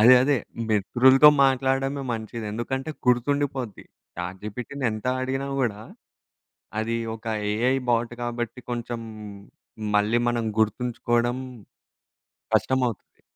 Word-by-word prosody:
అదే 120 +4 +9
అదే. 140 0 +3 0.3
మిత్రులతో 130 +7 +6 0.2
మాట్లాడడమే 135 +1 +1
మంచిది. 110 0 -5
ఎందుకంటే 130 +6 -3 0.2
గుర్తుండిపోద్ది. 130 -1 0 0.3
చాట్‌జీపీటీని 105 +9 -5
ఎంత 110 +3 -6 0.2
అడిగినా 135 +1 -2
గూడా 105 -5 -1 1.0
అది 115 +1 -1 0.2
ఒక 115 - -16 0.3
ఏఐ 120 +5 +2
బాట్ 120 0 +1
కాబట్టి 120 0 -3
కొంచెం 120 0 -4 0.9
మళ్ళీ 105 +3 +3
మనం 120 -1 -1 0.2
గుర్తుంచుకోవడం 120 +2 +1 1.2
కష్టమవుతది. 125 -4 0
120 Hz, 95 wpm, -25 LUFS, 115-130 Hz, 1.2 s, అదే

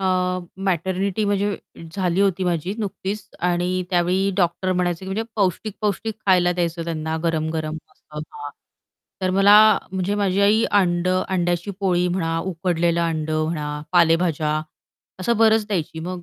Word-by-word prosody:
अ, 190 - -2 0.6
maternity 190 +3 0
म्हणजे 205 0 0 0.4
झाली 185 -1 0
होती 190 -2 +1
माझी 175 +2 -1
नुकतीच 200 -1 -4 0.2
आणि 180 +1 0
त्यावेळी 185 +2 +2
डॉक्टर 185 +1 +1
म्हणायचे, 180 0 -1
की - - -9
म्हणजे 195 +4 -2
पौष्टिक-पौष्टिक 210 +2 -1
खायला 180 -2 +4
द्यायचं 170 -1 -2
त्यांना, 160 -1 -3
गरम-गरम. 160 -1 -1 0.2
असं 150 0 -10 0.2
हां, 145 0 -6 0.7
तर 185 - 0
मला 195 +2 +6 0.4
म्हणजे 190 +2 -1
माझी 200 -1 +1
आई 215 +3 +4
अंडं 185 -2 +2
अंड्याची 175 +1 -1
पोळी 180 -2 +2
म्हणा, 165 -2 -1
उकडलेलं 170 -1 0
अंडं 155 -1 -1
म्हणा, 155 -2 -3 0.2
पालेभाज्या 165 -2 +3 0.7
असं 235 +5 +1
बरंच 220 -1 +4
द्यायची 165 -6 -3
मग 180 +1 -5
180 Hz, 135 wpm, -22 LUFS, 170-195 Hz, 0.7 s, मला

